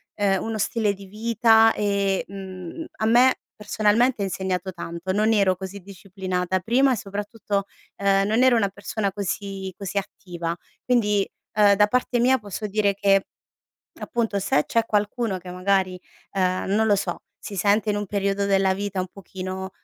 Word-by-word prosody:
ehm, 195 -2 +1
uno 225 -1 -3
stile 215 0 0
di 195 0 -12
vita 225 +2 +4
e, 200 -2 0
mhmm, 190 - -8
a 220 - -1
me 245 +3 +5 0.2
personalmente 215 +2 +1
ha - - 0
insegnato 190 -1 -2
tanto. 170 +1 -5
Non 215 +3 +2
ero 195 -3 +3
così 190 +1 -7
disciplinata 185 -1 -3
prima 255 +6 +3
e - - -2
soprattutto, 205 0 -3 0.3
ehm, 195 0 +2
non 220 +4 +2
ero 260 -2 +5
una 200 -3 +2
persona 200 +1 -3
così 195 -1 -4
così 200 0 -5
attiva. 175 -3 -6 0.3
Quindi, 210 -5 +2 0.3
uhm, 205 -1 +6
da 210 +1 +4
parte 250 +1 0
mia 260 +2 +4
posso 210 0 -6
dire 205 0 +1
che 195 -1 +3 0.8
appunto, 225 -4 -1
se 150 -6 +1
c'è 230 -1 +1
qualcuno 210 0 0
che 180 0 -10
magari, 185 0 0 0.3
ehm, 185 -1 0
non 220 +1 +3
lo 205 - +4
so, 200 - -3 0.2
si 200 - -8
sente 205 +3 +2
in 205 - 0
un 205 -1 -3
periodo 200 0 0
della 195 -1 +3
vita 200 -1 -3
un 185 - -3
pochino 190 0 -6
200 Hz, 165 wpm, -24 LUFS, 190-215 Hz, 0.8 s, uhm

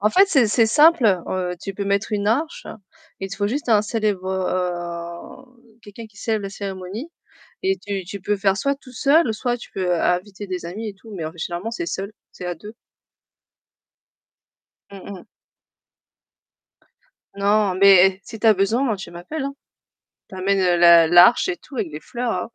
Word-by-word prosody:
En 210 +2 +2
fait, 390 +2 +5
c'est 265 - +4
c'est 225 +2 +3
simple, 295 +1 +5 0.2
heu, 180 -1 -2
tu 195 - -6
peux 200 +1 -4
mettre 200 +2 -1
une 205 -1 -1
arche, 290 +9 -1 0.5
il 195 0 -5
faut 205 - -1
juste 280 +3 -4
un 215 -3 +5
célèbre, 210 -4 -2
heu 185 +6 -5
quelqu'un 215 +2 -11
qui 215 - -24
célèbre 215 0 -2
la 195 - -5
cérémonie 195 - -7 0.5
et 385 0 +1
tu 200 -2 -5
tu 200 +3 -8
peux 205 +3 -1
faire 195 0 +1
soit 280 +7 0
tout 255 -2 -16
seul 280 +4 +3
ou - - 0
soit 240 +2 -2
tu 235 - -13
peux 180 -2 0
inviter 190 +4 -1
des 180 -3 -5
amis 215 +6 -6
et 205 - -8
tout, 220 +3 -16
mais 170 -4 -5
officiellement 175 +5 -5
c'est 335 +9 -4
seul, 200 - -4 0.2
c'est 180 - -8
à 175 - -3
2. 210 +7 -12 2.2
Mmh 195 -1 -11
mh. 185 - -13 2.1
Non, 200 0 +2
mais 190 0 +6
si 225 - -9
tu 225 - 0
as 220 - +7
besoin, 200 +7 +1
moi, 225 -6 0
tu 185 -3 -9
m'appelles, 180 - -6
hein. 275 0 -4 0.8
Tu - - -10
m’amènes 185 -2 +1
l'a 170 -1 +7
l'arche 175 - +6
et 360 - -2
tout 275 - -15
avec 205 -9 -3
les 150 - -7
fleurs, 230 0 -4
200 Hz, 180 wpm, -21 LUFS, 185-230 Hz, 2.2 s, as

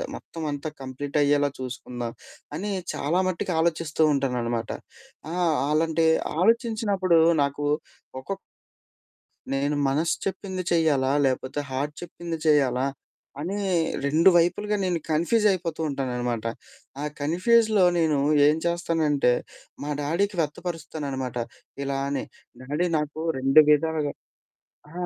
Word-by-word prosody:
మొత్తమంతా 155 -2 -5
కంప్లీట్ 135 +3 -4
అయ్యేలా 145 0 +3
చూసుకుందాం. 120 -2 -5 0.4
అని 200 +6 -3 0.2
చాలా 155 +6 0
మట్టికి 180 0 -2
ఆలోచిస్తూ 160 -1 +1
ఉంటాననమాట. 120 -4 -1 0.6
ఆహ్, 175 -3 +2 0.2
అలాంటి 160 +1 +2 0.3
ఆలోచించినప్పుడు 210 -5 +2 0.2
నాకు 140 +1 -2 0.6
ఒక్కొక్ 195 +9 -5 1.2
నేను 140 +2 0
మనస్సు 155 +5 +1
చెప్పింది 190 -1 -3
చెయ్యాలా, 150 -6 +3
లేపోతే 130 +2 -1
హార్ట్ 145 +3 -2
చెప్పింది 170 -1 -6
చేయాలా, 135 -4 +3 0.5
అని 180 +7 -3 0.5
2 155 +6 +5
వైపులుగా 180 +5 +1
నేను 175 -2 0
కన్‌ఫ్యూజయిపోతూ 175 -1 +1
ఉంటాననమాట. 125 -4 -2 0.6
ఆ - - -3 0.2
కన్‌ఫ్యూజ్‌లో 210 +6 +3
నేను 155 -4 +2 0.3
ఏం 150 +1 +3
చేస్తానంటే, 160 -6 +2 0.5
మా 145 - -4
డాడీకి 180 +6 0
వ్యక్తపరుస్తాననమాట. 150 -5 -4 0.5
ఇలా 135 0 -1
అని 140 -1 -2 0.4
డాడీ 150 +7 -1
నాకు 150 +1 -4 0.2
2 135 +4 +6
విధాలుగా 150 -1 +1 0.8
ఆ! - - -15
155 Hz, 105 wpm, -25 LUFS, 140-175 Hz, 1.2 s, 2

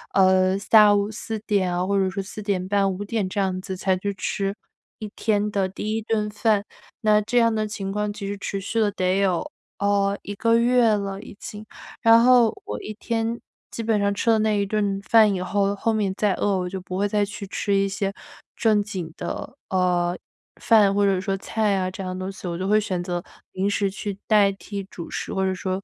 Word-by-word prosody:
呃， 185 0 +4
下 210 +1 +6
午 205 +1 0
4 220 +1 -5
点 190 -4 +1
啊， 180 +1 0
或 200 +1 0
者 190 -1 +2
是 195 0 -4
4 210 +2 -8
点 190 -3 -1
半、 200 -1 +2
5 200 +2 -5
点 200 -3 -1
这 200 - -3
样 185 -1 0
子， 190 -1 -6
才 190 0 +1
去 200 +2 -2
吃 195 +1 -2 0.4
1 215 -3 -6
天 210 -2 0
的 195 -2 0
第 215 +3 -3
1 225 - -1
顿 215 -1 -1
饭。 210 -1 +1 0.4
那 210 -1 +4
这 245 +4 -1
样 230 -1 +4
的 215 -1 -1
情 195 -2 -5
况， 210 0 -1
其 205 -1 -7
实 200 +1 -3
持 200 0 -3
续 225 +4 -2
了 210 -2 +3
得 185 +1 0
有， 185 -4 0 0.3
呃， 200 0 +1
1 205 - -5
个 230 +2 +2
月 240 -2 +4
了 200 -1 -4
已 215 - -11
经。 210 +1 -8 0.4
然 230 +1 +6
后 245 -3 +6 0.2
我 105 0 -5
一 215 - -6
天， 230 0 -2 0.3
基 230 - -5
本 220 -2 +1
上 200 0 +1
吃 230 - -1
了 220 -1 +4
那 215 -1 +1
一 200 - +1
顿 200 -1 -1
饭 215 0 +5
以 180 - -2
后， 200 +1 0
后 225 +2 0
面 200 -3 0
再 205 -3 +2
饿， 200 -2 +1
我 180 0 -2
就 190 0 -5
不 185 0 -6
会 205 +1 +1
再 205 0 +1
去 200 0 -5
吃 200 +1 -2
一 195 0 +2
些 195 0 -2 0.4
正 215 -2 +2
经 180 -6 -6
的， - - -6
呃， 180 -1 +1 0.4
饭 210 -4 +5
或 205 0 +2
者 190 -2 +2
说 195 -1 -1
菜 210 +1 0
啊， 185 -1 0
这 195 - -7
样 185 0 -4
的 185 - -6
东 195 - -4
西， 190 -1 -8
我 170 -1 -3
就 190 +1 -3
会 210 +1 +4
选 185 -3 -2
择 175 -1 -3 0.3
零 195 +2 0
食 200 -1 +1
去 200 0 -5
代 205 -2 +5
替 200 0 -7
主 170 - -8
食， - - -4
或 190 0 0
者 190 - 0
说， 185 0 -3
200 Hz, 230 characters per minute, -23 LUFS, 190-215 Hz, 0.4 s, 下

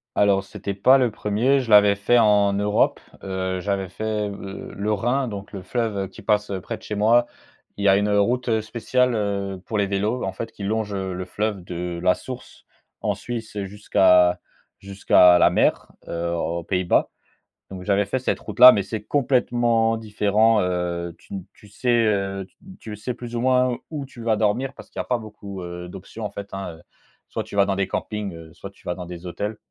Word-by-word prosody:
Alors 100 -1 +3
c'était 100 +1 -6
pas 130 +7 +5
le 125 -3 +2
1er, 110 +7 +1
je 125 -3 -5
l'avais 105 -1 +7
fait 100 +5 +2
en 105 -3 +4
Europe, 105 +1 +1 0.2
heu, 95 -1 -2
j'avais 95 0 -2
fait 105 +2 -2
le 100 -1 -8
le 105 +2 -2
Rhin, 125 +6 0
donc 100 -3 -7
le 100 - -7
fleuve 100 -1 -2
qui 100 - -14
passe 105 0 +1
près - - -5
de - - -22
chez 105 - -5
moi. 115 +4 +4 0.5
Il 100 - -2
y - - +6
a 95 - +6
une 100 +1 +1
route 115 +3 +2
spéciale, 125 +3 0
heu, 100 -3 -2
pour 110 - -2
les 100 - +2
vélos 105 +5 -1
en 95 - -2
fait 115 +4 -6
qui 100 - -9
longe 105 0 -1
le 95 -1 -4
fleuve 105 0 -3
de 90 0 -5
la 90 0 +3
source 130 -1 -10 0.4
en - - 0
Suisse 115 -2 -6
jusqu'à 95 -3 +3 0.4
jusqu'à 100 - -13 0.5
jusqu'à - - +1
la - - +6
mer, - - +1 0.2
heu, 85 0 -2
aux 85 0 -2
Pays-Bas, 90 -1 +1 0.6
donc 95 -1 -8
j'avais 100 0 +2
fait 100 +6 -2
cette 130 - -1
route 105 +1 -8
là, 125 +1 +13
mais 100 - +1
c'est 105 +2 -5
complètement 120 -4 +2
différent. 110 0 +2
Heu, 90 -1 -2
tu - - -17
ne 95 - -3
tu 105 - -18
sais, 120 +2 +1
heu, 100 -2 -1 0.3
tu 105 -1 -7
sais 120 +4 -4
plus 120 0 -8
ou 120 - -1
moins 125 -1 +2
où 150 -3 -4
tu 125 -3 -11
vas 115 -1 +1
dormir 115 +6 0
parce - - -13
qu'il - - -6
y - - +1
a - - -14
pas 125 - 0
beaucoup, 105 -3 -9
heu, 90 0 -7
d'options 100 +5 -9
en - - -5
fait 100 0 -7
hein. 95 -4 -6 0.5
Soit - - -3
tu - - -9
vas 100 - +5
dans 100 -1 -1
des 95 -1 0
campings, 95 -7 -5
soit 95 +2 -9
tu 100 - -25
vas 90 - -1
dans 90 0 -7
des 90 0 -9
hôtels 105 +5 -4
105 Hz, 205 wpm, -23 LUFS, 95-115 Hz, 0.6 s, là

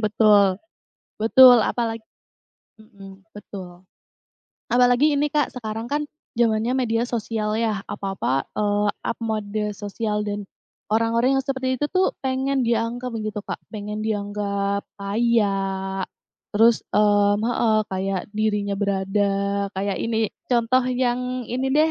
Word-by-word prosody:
betul, 210 -3 +4 0.6
betul 245 +2 +8
apalagi 225 0 -1 0.7
mhm, 195 -3 -15
betul, 185 -3 -10 0.8
apalagi 245 +5 +4
ini 290 +1 +1
Kak, 295 0 0
sekarang 225 -2 -5
kan 290 +4 -1 0.3
zamannya 230 +1 +1
media 235 -2 0
sosial 220 -3 -2
ya 215 -3 -1
apa-apa, 190 -9 -2
eee, 205 0 +1 0.2
up - - -2
mode 215 -1 -2
sosial 210 +1 -3
dan, 205 0 -3 0.5
orang-orang 230 +4 +2
yang 270 - 0
seperti 260 -1 -1
itu 275 - -2
tuh 375 0 +3 0.2
pengen 265 0 0
dianggap 235 +2 -1
gitu 215 -1 -4
Kak, - - -5
pengen 210 0 -5
dianggap 200 -1 -2
kaya, 200 -3 0 0.5
terus, 225 +2 +5
mmm, 205 -1 +4
heeh, 225 -2 +2
kayak 190 0 -1
dirinya 210 -2 0
berada 200 0 0
kayak 195 0 -1
ini 225 -1 -1 0.2
contoh 245 +1 +3
yang 250 0 -1
ini 255 +4 -2
deh 310 +3 +4
215 Hz, 120 wpm, -23 LUFS, 200-240 Hz, 0.8 s, betul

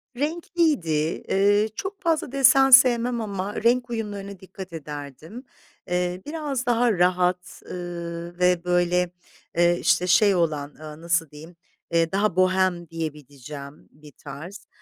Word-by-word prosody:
Renkliydi, 290 - 0
ııı, 205 +2 +3
çok 390 - -6
fazla 325 -7 0
desen 270 0 +5
sevmem 245 -2 +6
ama 200 -1 -4
renk 245 +1 +2
uyumlarına 205 -4 -5
dikkat 190 -1 -10
ederdim. 150 - -8 0.5
Eee, 180 +1 -1
biraz 295 -4 -3
daha 240 0 +2
rahat, 180 0 0
ııı, 170 -1 -6
ve 180 -1 +2
böyle, 180 0 +1 0.5
eee, 175 0 +4
işte, 180 - +2
şey 200 +2 +4
olan, 150 -4 -1
aaa, 155 0 -11
nasıl 170 -2 0
diyeyim, 160 +4 -13 0.4
eee, 165 0 +2
daha 200 -1 0
bohem 185 -2 +1
diyebileceğim 145 -3 -8
bir 150 0 -16
tarz. 150 +9 -10
180 Hz, 125 wpm, -24 LUFS, 165-230 Hz, 0.5 s, sevmem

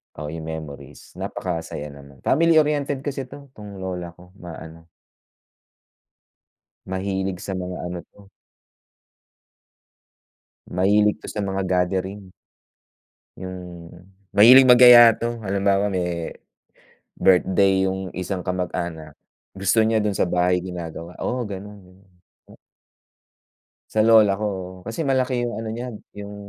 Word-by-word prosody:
Oh, 75 0 -6
yung 80 0 -7
memories 80 -3 -9
napakasaya 80 -4 -5
naman. 70 -2 -15
Family-oriented 150 -3 +2
kasi 140 -1 -4
'to, 140 +2 -13
'tong 100 -2 -10
lola 90 -2 -5
ko, 90 +1 -18
maano. 80 -2 -11 2.0
Mahilig 95 0 -3
sa 95 0 -5
mga 90 0 -5
ano 90 0 -5
'to. 100 -1 -19 2.5
Mahilig 105 +3 +3
'to - - -11
sa 105 - -4
mga 95 0 -2
gathering. 95 +1 -2 1.1
Hmm, 90 -2 -9 0.4
mahilig 125 +6 +7
mag-yaya 120 -1 +9
'to, 120 0 -4
halimbawa, 100 0 +1
me 90 -3 -3 0.9
birthday 95 +1 +3
yung 95 -1 -5
isang 90 0 -4
kamag-anak. 85 -4 -4 0.4
Gusto 95 +4 +2
niya 110 0 +2
dun 105 -1 0
sa 95 - 0
bahay, 90 0 +1
ginagawa, 85 -1 -8
oo, 125 +1 -2
ganun 105 -2 -8
yun. 90 +1 -21 1.9
Sa 110 - -1
lola 110 -3 +5
ko, 105 - -2
oo, 95 -2 -5
kasi 115 +8 -3
malaki 130 -3 0
yung 120 0 -3
ano 110 0 -5
niya, 120 +2 -5 0.3
yung, 100 0 -8
95 Hz, 115 wpm, -22 LUFS, 90-110 Hz, 2.5 s, mag-yaya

